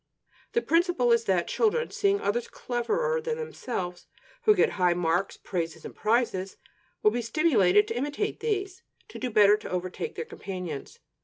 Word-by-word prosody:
The 470 - +1
principle 330 -7 +2
is 235 0 +3
that 185 -4 +1
children, 470 +1 +1
seeing 400 0 +2
others 235 +4 -1
cleverer 465 - -1
than 465 0 -2
themselves, 190 - -5 0.4
who 425 - +6
get - - +3
high 180 -2 +2
marks, 175 +2 0
praises 165 -3 -4
and - - -8
prizes, 215 -4 0 0.5
will 210 - +6
be 240 +2 -1
stimulated 220 - +3
to 230 - -3
imitate 290 - -2
these, 390 -4 -2 0.3
to - - -9
do 255 - -2
better, 210 -2 +6
to 210 - -9
overtake 185 - -4
their 470 - -4
companions. 180 - -7
235 Hz, 160 wpm, -27 LUFS, -, 0.5 s, who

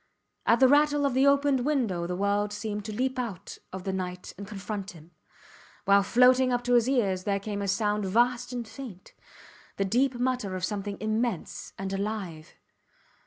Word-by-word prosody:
At 230 - +5
the 260 - +7
rattle 290 +1 +4
of 275 - +1
the 265 +2 +4
opened 280 -2 +3
window 230 - 0
the 180 - -2
world 200 +2 0
seemed 210 -1 -4
to 220 - -4
leap 255 +4 -1
out 205 -6 -5
of 190 -1 -6
the 190 0 -2
night 180 -1 -5
and 200 +1 -8
confront 205 -1 -5
him, 165 0 -15 0.7
while 200 +1 +6
floating 250 +4 +4
up 245 0 0
to 245 0 +1
his 240 +1 +4
ears 195 -9 +1
there 200 -1 0
came 205 0 -4
a 200 - -2
sound 205 +1 0
vast 240 +5 +1
and 240 -2 -4
faint; 225 -8 -10 0.6
the 195 - +1
deep 250 +6 +2
mutter 245 -6 -1
of 185 -1 -1
something 205 -1 -4
immense 215 -2 -2
and 195 0 -4
alive. 195 -6 -4
210 Hz, 180 wpm, -28 LUFS, 195-250 Hz, 0.7 s, the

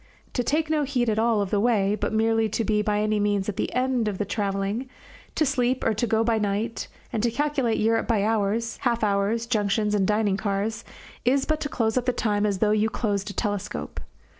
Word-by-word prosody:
To 245 - 0
take 305 +6 +1
no 310 -1 +1
heed 255 -4 0
at 215 - 0
all 225 -2 +2
of 200 - -3
the 205 - +2
way, 205 -3 +2
but 215 - -2
merely 225 0 +2
to 225 +2 -1
be 210 0 +1
by 210 0 0
any 215 0 +1
means 205 -1 0
at 210 - -2
the - - -2
end 250 -2 0
of 205 -3 -2
the 205 - -1
travelling, 200 +4 -2 0.5
to 315 - +2
sleep 255 -2 0
or 225 - +3
go 220 +1 +1
by 225 -1 +1
night, 210 +3 -2 0.3
and 220 - 0
to 235 - +2
calculate 270 -2 0
Europe 225 +1 +1
by 220 -4 +2
hours, 220 +1 0
half 235 -3 0
hours, 205 +3 +1
junctions, 210 -2 0
and 195 -2 +2
dining 210 -2 +1
cars, 210 +2 -2 0.4
is 265 +3 +2
but 310 0 0
to 290 - -2
close 225 -1 +1
up 250 - -8
the 250 - +3
time 210 -3 0
as 200 -2 0
though 210 +2 +2
you 215 +1 +2
closed 205 -3 -2
a - - -6
telescope. 205 -2 -3
220 Hz, 220 wpm, -25 LUFS, 205-235 Hz, 0.5 s, or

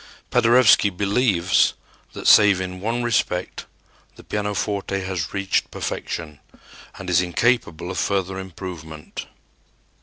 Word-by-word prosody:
Paderewski 115 -3 +5
believes 100 -1 +2 0.4
that, - - -8
save 105 -3 +6
in 90 0 -5
one 115 +5 -2
respect, 95 -6 -1 0.5
the - - -14
pianoforte 105 -1 -2
has 95 -4 -3
reached 100 -1 -1
perfection 75 -3 -5 0.6
and 95 - -9
is 90 0 +3
incapable 90 -2 0
of 95 - -3
further 95 -1 -1
improvement. 85 -4 -8
95 Hz, 110 wpm, -22 LUFS, 90-105 Hz, 0.6 s, save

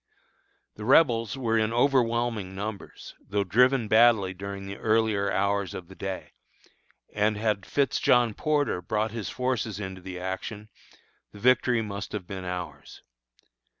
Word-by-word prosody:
The 105 - -7
Rebels 120 -2 +3
were 115 -3 +1
in 110 0 +1
overwhelming 120 -6 +1
numbers, 100 +1 -7
though 100 0 -1
driven 125 +4 +3
badly 110 -3 +4
during 100 +1 -7
the 100 0 -7
earlier 110 -2 +1
hours 100 -1 0
of 90 -1 -8
the 95 - -12
day; 95 -1 -5 0.8
and 105 0 +1
had 105 -3 -1
Fitz 140 -1 +1
John 120 -3 +3
Porter 145 -8 0
brought 105 +4 -1
his 115 -3 -5
forces 125 -5 -2
into 95 -2 -6
the 90 0 -7
action, 95 +3 -5 0.6
the 105 - -11
victory 125 0 +3
must 100 0 -6
have 105 -4 -4
been 95 -1 -7
ours. 90 -6 -7
105 Hz, 145 wpm, -27 LUFS, 95-115 Hz, 0.8 s, badly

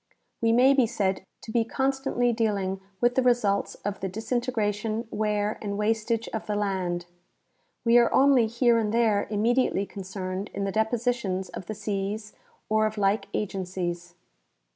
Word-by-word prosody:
We 230 0 +3
may 255 +4 +6
be 260 -4 +3
said 195 -5 -1 0.2
to 220 - -8
be 230 0 +2
constantly 265 -1 0
deal 220 -2 +1
ing 190 0 -3 0.2
with 240 0 +4
the 260 - +2
results 240 -5 +2
of 205 -1 -2
the 190 - -3
disintegration, 225 0 -2
wear 210 0 -1
and 200 -1 -3
wastage 225 +2 0
of 220 - -5
the 210 - -1
land. 185 -4 -1 0.8
We 235 +1 +6
are 235 - +3
only 265 -4 +5
here 235 +1 +3
and 210 -2 0
there 220 -3 +2
immediately 220 -1 +1
concerned 190 0 -5
in 200 - -2
the 195 - -1
depositions 220 -3 0
of 175 - -8
the 215 - -4
seas 210 +1 -3 0.3
or 215 0 +3
of 215 0 -6
like 200 +1 +1
agencies. 180 -3 -3
215 Hz, 160 wpm, -27 LUFS, 195-235 Hz, 0.8 s, may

